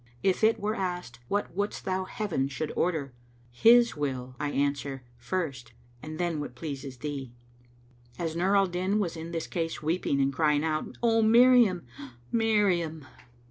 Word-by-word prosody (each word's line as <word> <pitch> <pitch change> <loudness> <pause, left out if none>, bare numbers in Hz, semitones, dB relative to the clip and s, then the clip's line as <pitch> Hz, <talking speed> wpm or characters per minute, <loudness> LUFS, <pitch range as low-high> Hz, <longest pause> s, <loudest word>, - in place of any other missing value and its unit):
If 190 +2 +1
it 220 +1 +4
were 210 +1 -1
asked, 180 - -4
'What 205 0 -2
wouldst 205 +2 -2
thou 190 -1 -1
Heaven 195 -11 -2
should 140 +3 -4
order?' 155 -7 -1 0.4
'His 235 - +5
will,' 130 -4 -3
I 145 0 -1
answer, 140 -2 -1
'First, 125 -2 -4 0.3
and 155 0 -7
then 170 -3 -1
what 145 -4 -6
pleases 135 -1 -6
thee.'" 135 -3 -5 0.8
As 165 -2 -3
Nur 185 +4 +2
al 195 - +5
Din 185 +3 -1
was 190 -6 -1
in 165 +1 -6
this 165 -1 -3
case, 165 -2 -3
weeping 155 -3 0
and 135 0 +2
crying 150 0 +2
out, 155 -1 -2
"O 225 -1 +4
Miriam! 230 - +5
O 140 -3 -10 0.2
Miriam!" 190 - +1
165 Hz, 160 wpm, -28 LUFS, 140-195 Hz, 0.8 s, His